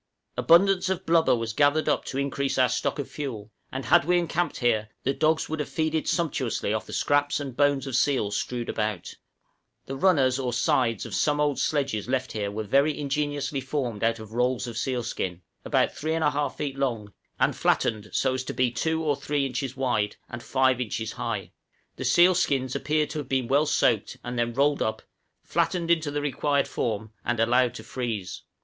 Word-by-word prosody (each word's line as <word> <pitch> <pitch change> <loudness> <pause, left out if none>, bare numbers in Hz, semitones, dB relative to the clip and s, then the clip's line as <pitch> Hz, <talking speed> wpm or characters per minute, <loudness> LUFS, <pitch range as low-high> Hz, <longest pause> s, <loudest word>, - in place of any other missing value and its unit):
Abundance 185 +2 +4
of 190 -2 -2
blubber 165 -4 +4
was 115 -2 -3
gathered 145 +4 +3
up - - +1
to 135 - -5
increase 140 0 -1
our 130 -1 +4
stock - - -1
of 145 - -3
fuel, 115 -8 -6 0.2
and 130 -1 -5
had 115 - +5
we 175 +3 +2
encamped 175 0 -1
here, 110 -3 +1
the 135 - +1
dogs 160 +2 +1
would 160 0 -4
have 150 - -3
feasted 160 0 -1
sumptuously 135 - -1
off 110 - -3
the - - -9
scraps 145 0 +1
and 135 -4 -6
bones 145 -1 +2
of 135 -3 -3
seals 125 -7 +1
strewed 120 +2 -3
about. 110 -1 -1
{NATIVE 85 - -20
SLEDGES.} - - -18
The 135 - -5
runners 135 -6 +3
(or 125 -2 -2
sides) 120 -2 +1
of - - -8
some 150 -1 +1
old 145 -2 +1
sledges 135 -7 -1
left 130 0 -1
here 105 -2 -2
were 110 +2 -4
very 140 +8 +2
ingeniously 145 -1 -2
formed 125 -5 -3
out 115 0 +2
of 110 -1 -11
rolls 125 +1 +1
of 120 -2 -6
seal 125 -3 -1
skin, 90 -6 -4 0.2
about - - +2
3 160 +2 -3
1/2 150 -3 +1
feet 135 -2 -4
long, 115 -7 -2 0.3
and - - +2
flattened 105 -2 0
so 130 - +1
as 130 0 -2
to - - -5
be 125 -1 +2
2 160 +7 -1
or 150 -2 +1
3 145 0 -1
inches 130 0 -4
wide 115 -6 0
and 120 - -7
5 130 -1 +2
inches 110 -1 -3
high; - - -4 0.5
the - - -4
seal 175 +2 +6
skins 130 -6 0
appeared 150 0 0
to 155 - -3
have 140 -3 -7
been 130 -3 0
well 145 +4 +3
soaked 115 -7 +1
and 120 0 -4
then 120 0 +1
rolled 140 +4 +2
up, 110 - -1 0.4
flattened 170 -2 0
into 160 -3 +2
the 145 0 -2
required 145 0 +1
form 110 -2 -3
and 120 -1 -1
allowed 120 +1 +3
to - - -8
freeze. 115 -7 -4
135 Hz, 200 wpm, -26 LUFS, 120-150 Hz, 0.5 s, seal